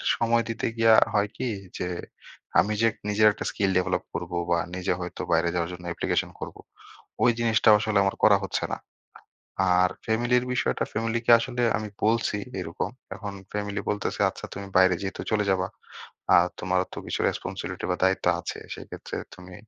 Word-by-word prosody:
সময় 115 0 +2
দিতে 115 - -2
গিয়া 115 0 +6 0.2
হয় 105 -1 +2
কি? 125 - -1 0.3
যে 90 - -1 0.7
আমি 105 - +2
যে 115 - +5 0.2
নিজের 105 +1 +5
একটা - - -6
স্কিল 100 -2 0
ডেভেলপ 90 0 -1
করবো 90 - -3
বা, 85 - +4 0.2
নিজে 95 0 0
হয়তো 90 - -5
বাইরে 85 +1 +3
যাওয়ার 85 0 -1
জন্য 90 0 -9
অ্যাপ্লিকেশন 85 - -1
করবো, - - -7 0.6
ওই 120 - +6
জিনিসটা 115 -1 +3
আসলে 110 -1 0
আমার 95 - 0
করা 105 -2 +7
হচ্ছে 95 - -1
না। - - -1 1.0
আর 90 0 +4 0.2
ফ্যামিলির 120 +2 +2
বিষয়টা 65 - 0
ফ্যামিলিকে 115 +1 -1
আসলে 125 0 -2 0.2
আমি 110 0 -5 0.2
বলছি 110 -1 +2 0.2
এরকম। 85 -2 -3 0.3
এখন 105 -1 -6 0.2
ফ্যামিলি 105 0 -2
বলতেছে, 105 -1 -2
"আচ্ছা - - -8
তুমি 100 - -6
বাইরে 95 0 +6
যেহেতু 95 - -4
চলে 105 -1 +2
যাবা। 95 -1 +1 0.7
আর 85 - +5
তোমারও 90 0 +1
তো - - -6
কিছু - - -3
রেসপনসিবিলিটি - - -4
বা, 90 - +1
দায়িত্ব 95 0 +1
আছে। - - -5 0.2
সেক্ষেত্রে - - -8 0.2
তুমি 90 0 -12
100 Hz, 170 wpm, -26 LUFS, 90-115 Hz, 1.0 s, করা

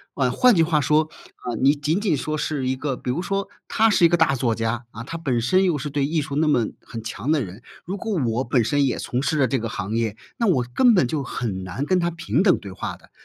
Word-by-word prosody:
呃， 130 -3 +1
换 250 - +5
句 165 - +4
话 160 -1 +2
说， 155 +3 +2 0.3
啊， 120 - -5
你 135 +2 +5
仅 150 +5 -1
仅 200 -7 +1
说 155 +2 -3
是 145 -4 -2
一 130 - 0
个 135 0 -3
比 125 - -6
如 125 - 0
说 195 +1 -2 0.2
他 225 +1 +3
是 190 -4 +4
一 - - +9
个 175 - +3
大 160 -4 +3
作 120 -3 0
家， 115 +1 -2
啊， 110 - -8
他 165 +7 -6
本 130 -8 -1
身 185 +11 +3
又 180 -4 +2
是 145 +1 -4
对 140 -1 0
艺 155 +2 0
术 140 -1 -5
那 155 +2 +2
么 120 -7 +2
很 115 -4 -8
强 115 +5 -3
的 155 -4 +2
人， 100 +4 -10 0.2
如 190 +4 -4
果 220 +2 -3
我 120 +2 0
本 125 -1 +2
身 145 +5 +2
也 130 - -1
从 125 +2 -2
事 155 +1 0
了 130 - +4
这 130 - 0
个 115 -1 -3
行 105 +1 -4
业， 115 -3 -1 0.2
那 235 - 0
我 140 -10 +3
根 250 -2 +6
本 180 - +3
就 145 +2 -2
很 105 -7 -4
难 95 +9 -4
跟 185 -1 +3
他 170 0 0
平 165 +2 0
等 195 - +4
对 100 - -9
话 95 - -5
的。 - - -21
140 Hz, 295 characters per minute, -23 LUFS, 120-165 Hz, 0.3 s, 一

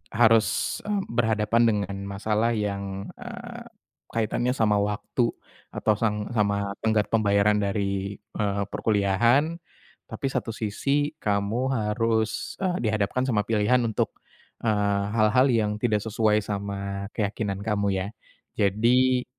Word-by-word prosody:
harus, 115 -1 +3
eee, 205 -2 0
berhadapan 110 -1 +2
dengan 100 -3 0
masalah 110 +3 0
yang, 100 - -3
eee, 240 0 -8 0.4
kaitannya 120 +3 -1
sama 105 -4 +2
waktu 105 +4 0 0.5
atau 110 - +2
sang 105 0 -1
sama 100 -3 0
tenggat 110 -2 +1
pembayaran 105 -1 +3
dari, 100 0 -1
eee, 100 -1 -3
perkuliahan. 115 - +2 0.5
Tapi - - -6
satu 115 - -2
sisi, 140 +8 0
kamu 100 +3 0
harus, 110 0 0
eee, 180 -1 +1
dihadapkan 110 +5 0
sama 105 -5 +1
pilihan 115 +3 +2
untuk, 110 -2 -1 0.5
eee, 105 -2 +1
hal-hal 115 +4 +4
yang 110 -3 +2
tidak 110 -4 +2
sesuai 110 0 +1
sama 100 -1 -4
keyakinan 100 -2 -2
Kamu 100 -2 0
ya. 95 0 -1 0.5
Jadi, 125 +5 +3
105 Hz, 120 wpm, -26 LUFS, 100-115 Hz, 0.5 s, hal-hal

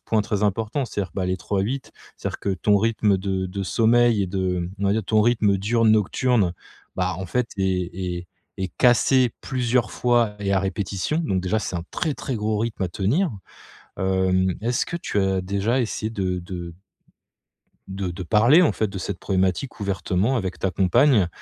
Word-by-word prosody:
point 110 - +1
très 105 0 -2
important, 110 +6 -1
c'est-à-dire, 100 -6 -4
bah, 95 -2 -1
les 90 0 0
trois-huit. 100 +9 -3 0.2
C'est-à-dire - - -4
que 100 - -1
ton 105 +2 +2
rythme 110 -2 +2
de 95 -1 -2
de 95 +2 -4
sommeil 115 +1 +3
et - - -1
de, 90 -2 -1
on 100 - -2
va 100 - +3
dire, 110 +1 -1
ton 110 -1 +3
rythme 110 -4 +3
diurne-nocturne, 110 0 +2 0.4
bah, 90 -1 0
en 95 - -5
fait, 125 +5 -1
est 90 -2 0
est 90 -1 -4 0.3
est 95 -1 -2
cassé 125 0 +4
plusieurs 125 -3 0
fois 120 -4 +1
et 100 -1 0
à 95 - +3
répétition. 95 - -2
Donc, 95 -10 0
déjà 95 +4 0
c'est 100 - -4
un 85 - -3
très, 160 -4 -2
très 130 -2 -4
gros 105 0 -1
rythme 110 -3 -2
à - - -2
tenir. 120 - 0 0.7
Hem, 95 -1 +1
est-ce 120 +2 0
que 170 - -3
tu 105 - -2
as 95 -1 +1
déjà 100 +7 0
essayé 110 -1 -3
de 95 -4 -2
de 85 -1 -7 1.1
de 95 -1 -4
de 90 +2 -6
parler, 120 - +5
en 175 - +4
fait, 110 - -1
de 95 - -7
cette 95 0 -4
problématique 95 +6 -1
ouvertement 100 +4 0
avec 95 -4 -4
ta 95 - 0
compagne? 100 +2 +4
100 Hz, 180 wpm, -23 LUFS, 95-115 Hz, 1.1 s, parler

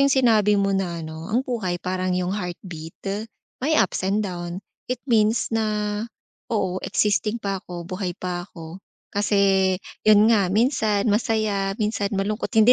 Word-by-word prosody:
yung 275 - +5
sinabi 220 -6 +4
mo 195 0 +2
na 175 -4 -1
ano, 160 +3 -7
ang 240 +4 +1
buhay 220 -9 -2
parang 185 0 -1
yung 180 0 -1
heartbeat, 175 -4 -6 0.6
my 310 +4 +2
ups 195 - +2
and 200 +3 +1
down, 175 0 -5 0.2
it 250 -1 -2
means 225 -2 +2
na, 210 -1 0 0.5
"Oo 185 -4 -1
existing 210 +1 +1
pa 195 -4 -3
ko 175 -1 -6
buhay 185 0 -4
pa 180 0 -4
ako," 165 +2 -10 0.3
kasi 195 -2 +3 0.3
yun 215 +2 +7
nga 200 -5 +3
minsan 215 -1 +2
masaya 210 -3 0
minsan 210 -2 0
malungkot 210 +3 -1
hindi 220 +3 +8
200 Hz, 150 wpm, -23 LUFS, 185-215 Hz, 0.6 s, hindi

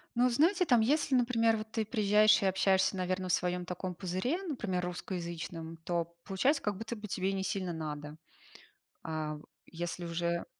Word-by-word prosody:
Ну, 240 - +3
вы - - +4
знаете, 345 +8 +3
там 245 -7 +5
если, 280 +3 +2
например, 230 -2 +3
вот 215 0 -7
ты 220 -1 -1
приезжаешь 215 -1 +4
и - - +1
общаешься, 190 0 +3
наверно, 185 0 -1
в - - +2
своем 180 0 0
таком 180 +1 -4
пузыре, 190 - -1
например, 215 - -2
русскоязычном, 170 -2 -5
то 170 +1 -1 0.2
получается 260 +10 +1
как 205 -2 -1
будто 225 +3 -5
бы 210 -1 -8
тебе 190 -1 -1
и - - -1
несильно 190 -2 -2
надо. 150 -1 -5 0.9
А 155 -1 -3
в 150 - -12 0.2
если 175 +1 -5
уже 170 0 -1
190 Hz, 175 wpm, -32 LUFS, 170-225 Hz, 0.9 s, там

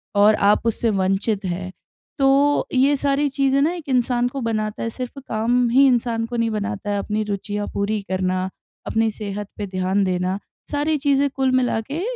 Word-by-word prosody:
और 210 +1 +6
आप 205 +3 +3
उससे 230 0 +1
वंचित 195 +1 0
हैं, 185 +1 -3 0.5
तो 275 +1 +3
ये 270 +3 +4
सारी 280 +1 +1
चीज़ें 275 0 +2
ना 315 +4 +3
एक 330 -5 -8
इंसान 245 -1 +2
को 270 +2 -5
बनाता 215 -2 -2
है, 230 - -1
सिर्फ़ 250 +3 -6
काम 235 +3 +1
ही 270 +4 +5
इंसान 235 -2 +1
को 240 +1 -6
नहीं 230 -1 +1
बनाता, 205 -1 -2
अपनी 215 +1 -2
रुचियाँ 205 0 -3
पूरी 205 +1 -1
करना, 185 0 -1 0.4
अपनी 225 0 +1
सेहत 205 -1 -5
पे 205 - -4
ध्यान 185 +1 0
देना, 185 +1 -1 0.3
सारी 295 +1 +1
चीज़ें 280 0 +2
कुल 265 -1 0
मिला 245 -3 +1
के 315 +4 -2
225 Hz, 180 wpm, -22 LUFS, 200-265 Hz, 0.5 s, और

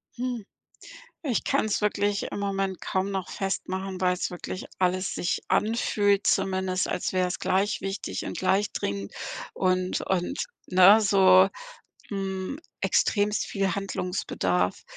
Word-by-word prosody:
Hm, 245 -2 -3 0.8
ich 265 -8 -1
kann's 215 -2 +1
wirklich 205 -1 +1
im - - -3
Moment 195 -1 -1
kaum 190 +1 -1
noch 190 -2 -3
festmachen, 190 -1 -3
weil's 180 -1 +1
wirklich 180 +1 -6
alles 185 0 +1
sich 175 - -1
anfühlt, 205 -2 +2
zumindest 190 -1 +1
als 180 - -2
wäre 185 -1 +1
es 180 - -4
gleich 195 +3 +1
wichtig 195 +1 -4
und - - -5
gleich 195 +2 +1
dringend 100 0 -3 0.4
und 185 -1 +1
und, 190 +8 -1 0.3
ne, 185 +4 +7
so 190 -2 +6 0.6
hm, 195 +5 -3 0.2
extremst 210 0 +2
viel 195 -3 -1
Handlungsbedarf. 180 - -1
190 Hz, 125 wpm, -26 LUFS, 185-200 Hz, 0.8 s, ne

